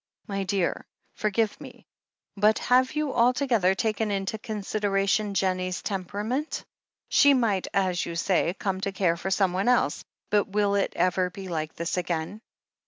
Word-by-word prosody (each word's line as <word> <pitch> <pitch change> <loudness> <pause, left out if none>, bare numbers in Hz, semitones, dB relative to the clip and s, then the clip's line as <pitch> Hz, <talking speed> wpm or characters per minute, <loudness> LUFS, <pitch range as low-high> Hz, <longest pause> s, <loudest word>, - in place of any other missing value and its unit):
"My 195 -1 -2
dear, 190 -2 -1 0.3
forgive 215 0 -1
me, - - -12 0.5
but 210 +2 +3
have 255 +1 +3
you 300 -2 -1
altogether 235 -5 +3
taken 220 0 -1
into 195 +2 -2
consideration 205 -2 -1
Jennie's 185 -1 -1
temperament? 210 - -3 0.4
She 285 -1 +6
might, 215 -7 +1
as 185 -3 +1
you 170 - -5
say, 175 0 +1
come 190 -2 -2
to 195 - -1
care 185 -3 +1
for 175 +3 -4
someone 190 +1 +1
else 250 - +2
— - - -50
^but 205 -1 +3
will 205 0 +1
it 200 -1 0
ever 180 +1 +1
be 190 +1 -9
like 155 -2 -3
this 170 +2 -3
again 175 +3 -3
195 Hz, 155 wpm, -26 LUFS, 185-215 Hz, 0.5 s, She